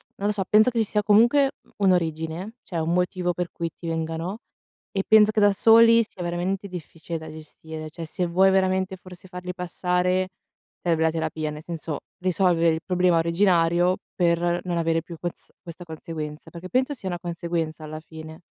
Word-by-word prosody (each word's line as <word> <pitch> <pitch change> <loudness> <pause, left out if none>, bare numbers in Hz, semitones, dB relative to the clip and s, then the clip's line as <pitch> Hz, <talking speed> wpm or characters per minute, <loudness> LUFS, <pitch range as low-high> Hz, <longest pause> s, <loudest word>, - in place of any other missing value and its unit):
non 200 - -2
lo - - +2
so, 205 -2 -1
penso 215 +3 +6
che 235 - -5
ci 220 - +2
sia 210 0 0
comunque 235 +7 +5 0.3
un'origine, 175 +1 0
cioè 170 - -4
un 160 +1 0
motivo 180 0 0
per 175 0 -3
cui 170 -1 -3
ti 170 - -8
vengano 165 +4 -3 0.6
e 195 - +2
penso 215 0 +6
che 215 - 0
da 205 - +6
soli 230 +2 +6
sia 180 - -11
veramente 180 +3 -2
difficile 170 -2 -7
da 160 - -9
gestire. 155 0 -9
Cioè 165 +1 -7
se 175 +3 -2
vuoi 190 +3 +4
veramente 190 0 +1
forse 185 0 -13
farli 180 0 -6
passare 180 +1 0 0.5
serve 165 -2 +1
la 160 - +4
terapia, 160 -1 -2
nel 150 +1 -8
senso 165 -3 -5 0.2
risolvere 180 -3 +2
il 160 - -5
problema 180 -2 +3
originario 170 0 +3 0.2
per 175 0 +2
non 175 -2 -1
avere 165 0 +1
più 170 -1 -9
ques 175 -1 -6
questa 175 0 -9
conseguenza, 155 -1 -7
perché 175 +2 -9
penso 260 +5 +1
sia 200 -8 -5
una 175 - -3
conseguenza 170 -2 -3
alla 155 0 -6
fine. 160 0 -11
175 Hz, 180 wpm, -24 LUFS, 165-190 Hz, 0.6 s, penso